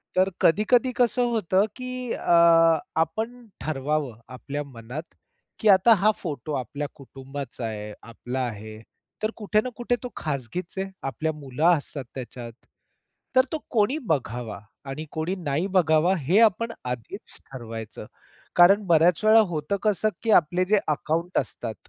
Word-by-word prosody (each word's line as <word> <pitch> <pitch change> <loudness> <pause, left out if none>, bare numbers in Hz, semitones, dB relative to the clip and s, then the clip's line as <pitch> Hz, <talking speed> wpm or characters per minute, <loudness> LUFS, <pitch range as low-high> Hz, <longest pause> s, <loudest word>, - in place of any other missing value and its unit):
तर 185 +1 +3
कधी-कधी 235 +8 +3
कसं 245 0 +2
होतं, 200 -3 +2
की 255 -1 -5
अ, 165 -1 +5 0.2
आपण 225 +9 -3
ठरवावं, 145 -4 -2
आपल्या 145 +3 -5
मनात, 130 +2 -8 0.6
की 220 - 0
आता 195 +4 +7
हा 215 - +6
फोटो 155 -2 -5
आपल्या 140 +3 -4
कुटुंबाचा 135 -2 -8
आहे, 105 -1 -5
आपला 120 +2 -6
आहे. 110 -1 -8 0.4
तर 215 +1 0
कुठे 215 0 +1
ना 255 - -4
कुठे 245 0 0
तो 250 - -4
खाजगीच 150 +5 -4
आहे. 190 0 -2
आपल्या 135 +4 -2
मुलं 145 0 -3
असतात 145 -1 -7
त्याच्यात. 120 -2 -7 0.9
तर 260 - +7
तो 315 - -1
कोणी 230 +5 +2
बघावा? 120 - -3 0.3
आणि 150 +3 -5
कोणी 160 +4 -2
नाही 145 +5 0
बघावा? 160 +1 +4
हे 165 +5 +2
आपण 230 +1 +3
आधीच 125 -2 -6
ठरवायचं. 115 -4 -8 0.5
कारण 195 +4 +6
बऱ्याच 170 +2 +4
वेळा 220 +1 +7
होतं 160 +6 -1
कसं, 215 0 +2
की 225 - 0
आपले 175 +3 -1
जे 205 +3 +3
अकाउंट 165 +4 -1
असतात, 115 -2 -4
160 Hz, 145 wpm, -25 LUFS, 135-205 Hz, 0.9 s, आता